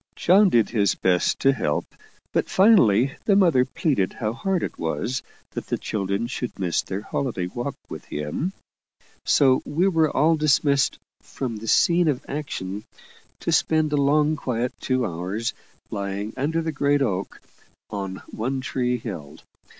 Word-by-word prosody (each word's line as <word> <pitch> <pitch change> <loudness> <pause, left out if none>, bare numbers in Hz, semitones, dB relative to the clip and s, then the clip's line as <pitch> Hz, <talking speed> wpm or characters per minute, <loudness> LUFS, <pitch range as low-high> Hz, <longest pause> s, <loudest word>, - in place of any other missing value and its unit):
John 195 +3 +5
did 115 - +3
his 105 -4 +2
best 90 -1 +1
to 135 - +5
help, 75 - -1 0.5
but - - 0
finally 135 - +4
the 200 - +4
mother 170 -10 +5
pleaded 130 - 0
how 110 -2 -2
hard 185 +8 -1
it - - -5
was 85 - -2 0.3
that - - -6
the - - -1
children 100 +1 -2
should 125 0 -5
miss 90 -3 0
their 95 +1 -5
holiday 115 -10 -2
walk 120 +9 -4
with - - -8
him, 75 - -3 0.7
so 130 -2 +4
we 165 +6 +1
were 165 -5 +3
all 160 +4 +3
dismissed 140 -2 +2 0.2
from 120 -4 -5
the 110 +2 -8
scene 170 +8 +4
of 140 -5 -1
action, 105 -9 -4 0.6
to - - -1
spend 155 -1 +2
a - - +2
long, 150 +2 +3
quiet 125 -3 -2
two 130 -2 0
hours, 95 +6 -3 0.4
lying 100 +1 -3
under 160 +5 -1
the 160 - -1
great 145 -1 +2
oak 95 -6 -3 0.5
on 95 -2 -5
One 130 +5 -2
Tree 125 -1 -1
Hill. 85 -11 -7
125 Hz, 155 wpm, -24 LUFS, 100-150 Hz, 0.7 s, John